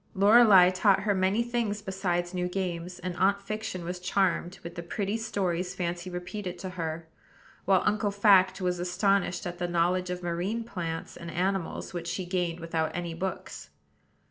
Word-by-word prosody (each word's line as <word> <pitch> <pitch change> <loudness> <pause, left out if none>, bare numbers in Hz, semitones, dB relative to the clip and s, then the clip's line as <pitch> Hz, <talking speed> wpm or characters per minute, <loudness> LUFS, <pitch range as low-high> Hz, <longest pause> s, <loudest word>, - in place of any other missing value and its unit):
Lorelei 200 -2 +7
taught 195 +1 +3
her 205 +1 +1
many 190 +4 +2
things 235 -3 -1
besides 180 -3 -2
new 180 -1 -1
games; 180 -1 -3
and 180 -1 -5
Aunt 200 +2 +3
Fiction 205 -3 -5
was 180 +1 -4
charmed 180 -1 0
with 170 - -7
the 170 - -6
pretty 200 +4 -2
stories 190 -5 -2
Fancy 175 0 -3
repeated 180 +1 -5
to 185 - -6
her, 165 -2 -4 0.6
while 190 -2 +4
Uncle 210 0 +1
Fact 195 -2 +4
was 180 -1 0
astonished 180 +1 +1
at 175 0 -5
the 175 - -1
knowledge 175 +1 +1
of 180 0 -4
marine 180 +7 -2
plants 165 -7 -5
and 170 - -8
animals 185 +1 -2
which 170 -1 -5
she 180 +2 -3
gained 175 -2 -1
without 165 -1 -1
any 175 -1 -3
books. 185 +3 -5
180 Hz, 170 wpm, -28 LUFS, 175-195 Hz, 0.6 s, Lorelei